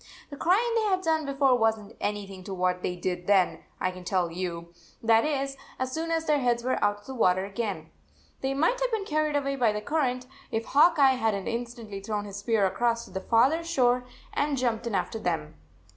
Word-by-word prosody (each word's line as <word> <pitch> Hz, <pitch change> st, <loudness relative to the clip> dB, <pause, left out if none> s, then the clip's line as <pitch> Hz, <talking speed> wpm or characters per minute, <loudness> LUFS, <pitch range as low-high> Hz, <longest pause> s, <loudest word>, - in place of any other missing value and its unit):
The -, -, -6 dB
crying 400 Hz, +11 st, +2 dB
they 455 Hz, -, +2 dB
had 375 Hz, -1 st, +1 dB
done 315 Hz, -3 st, +1 dB
before 275 Hz, -2 st, +3 dB
was 225 Hz, 0 st, +3 dB
n 205 Hz, -2 st, -12 dB
t -, -, -17 dB
anything 195 Hz, -2 st, -4 dB
to 195 Hz, -, -5 dB
what 180 Hz, 0 st, 0 dB
they 180 Hz, -, -2 dB
did 180 Hz, 0 st, -3 dB
then, 195 Hz, -3 st, +3 dB, 0.2 s
lean 185 Hz, 0 st, -3 dB
tell 180 Hz, -2 st, 0 dB
you. 170 Hz, -1 st, -5 dB, 0.3 s
That 225 Hz, 0 st, +5 dB
is, 275 Hz, -2 st, -1 dB, 0.2 s
as 260 Hz, 0 st, -2 dB
soon 320 Hz, +4 st, -3 dB
as 325 Hz, -1 st, 0 dB
their 300 Hz, -2 st, +3 dB
heads 240 Hz, -2 st, +1 dB
were 255 Hz, +1 st, 0 dB
out 205 Hz, 0 st, +1 dB
of -, -, -23 dB
the 265 Hz, -, -7 dB
water 185 Hz, -6 st, +2 dB
again. 195 Hz, -6 st, -4 dB, 0.5 s
They 270 Hz, 0 st, -1 dB
might 335 Hz, -, +2 dB
have -, -, +2 dB
been 435 Hz, -3 st, -1 dB
carried 305 Hz, -3 st, 0 dB
away 275 Hz, -1 st, 0 dB
by 235 Hz, -4 st, +3 dB
the 210 Hz, -, -2 dB
current, 255 Hz, -2 st, -1 dB, 0.2 s
if 225 Hz, +1 st, -2 dB
Hawk 315 Hz, +6 st, +5 dB
Eye 265 Hz, -2 st, +5 dB
had 220 Hz, -2 st, +2 dB
n 195 Hz, -, -5 dB
t -, -, -2 dB
instantly 235 Hz, -4 st, -5 dB
thrown 205 Hz, +1 st, -3 dB
his 200 Hz, -1 st, -7 dB
spear 205 Hz, 0 st, +1 dB
across 235 Hz, +4 st, 0 dB
to -, -, -15 dB
the 190 Hz, +1 st, -4 dB
farther 265 Hz, +11 st, +3 dB
shore 250 Hz, -7 st, +2 dB, 0.3 s
and 285 Hz, -1 st, 0 dB
jumped 235 Hz, -2 st, -1 dB
in 225 Hz, -, -2 dB
after 225 Hz, -, -2 dB
them. 160 Hz, -6 st, -2 dB
235 Hz, 225 wpm, -27 LUFS, 195-280 Hz, 0.5 s, That